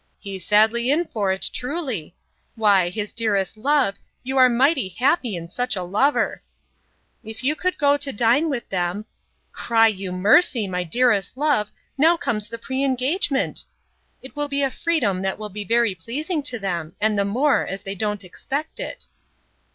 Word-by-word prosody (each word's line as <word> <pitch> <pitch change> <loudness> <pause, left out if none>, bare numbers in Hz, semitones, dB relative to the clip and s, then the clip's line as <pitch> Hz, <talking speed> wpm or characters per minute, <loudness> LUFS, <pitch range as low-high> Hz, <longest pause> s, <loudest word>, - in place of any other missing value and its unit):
—He's 195 -2 -8
sadly 220 +5 +3
in 320 +5 +2
for't, 195 - -1
truly! 250 - -4 0.4
Why, 200 -5 +3
his 210 +3 -5
dearest 205 -5 0
love, 260 -3 +1 0.3
you 265 +1 -4
are 255 -1 +7
mighty 260 - +2
happy 245 - +1
in 170 -1 -6
such 245 +6 -2
a 185 - -3
lover!'—If 220 +1 -3
you 290 +4 +2
could 365 +3 -1
go 285 -1 +3
to 285 -1 -3
dine 245 +9 +2
with 265 -5 -3
them—'Cry 205 +4 -1
you 195 -4 -1
mercy, 210 - +3
my 180 -1 -2
dearest 215 +3 +1
love, 285 -8 +1 0.3
now 330 +4 +5
comes 215 -8 -2
the 230 - -5
pre 260 +3 -3
engagement!'—it 275 - -3
will 290 0 -2
be 280 0 0
a 270 - +1
freedom 250 - 0
that 190 0 -2
will 215 -1 -6
be 210 +1 -6
very 230 +1 +2
pleasing 295 - -3
to 265 -4 -2
them, 175 -6 -4
and 215 0 +1
the 200 - +2
more, 255 +9 +2
as 195 - -6
they 195 - -4
don't 210 0 -3
expect 280 - -5
it. - - -6
230 Hz, 160 wpm, -22 LUFS, 200-275 Hz, 0.4 s, are